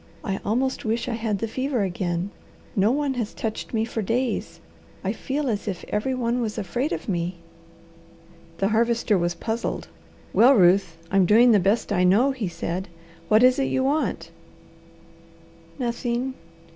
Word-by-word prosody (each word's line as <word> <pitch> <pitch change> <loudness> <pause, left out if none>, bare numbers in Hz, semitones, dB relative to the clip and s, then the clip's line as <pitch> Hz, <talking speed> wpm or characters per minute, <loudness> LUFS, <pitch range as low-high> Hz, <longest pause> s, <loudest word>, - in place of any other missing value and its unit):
"I 195 -4 -2
almost 260 +5 0
wish 230 +3 -1
I 245 - -1
had 225 -2 -1
the 225 - -2
fever 255 0 -1
again. 175 0 -2 0.4
No 200 +2 +3
one 285 0 0
has 235 -4 -4
touched 220 -1 -4
me 225 -1 0
for 225 -1 -3
days. 235 +5 -2 0.4
I - - -1
feel 285 +1 -3
as 215 -4 -2
if 190 -4 -4
every 235 +5 -1
one 245 0 0
was 215 -2 -3
afraid 240 - -2
of - - -4
me." 175 -2 -1 1.2
The 195 +2 +1
Harvester 230 -1 +2
was 175 -1 0
puzzled. 225 +1 -3 0.4
"Well, 260 +4 +6
Ruth, 180 -3 +4
I'm 195 -2 +4
doing 235 +4 +6
the 210 - +5
best 205 +3 +1
I 180 -2 +2
know," 210 +10 +4
he 245 -7 -3
said. 175 +2 -4 0.4
"What 215 +2 +5
is 255 +1 +5
it 270 - +2
you 260 - 0
want?" 290 +4 -1 1.5
"Nothing!" 245 0 -2
225 Hz, 160 wpm, -24 LUFS, 195-250 Hz, 1.5 s, Well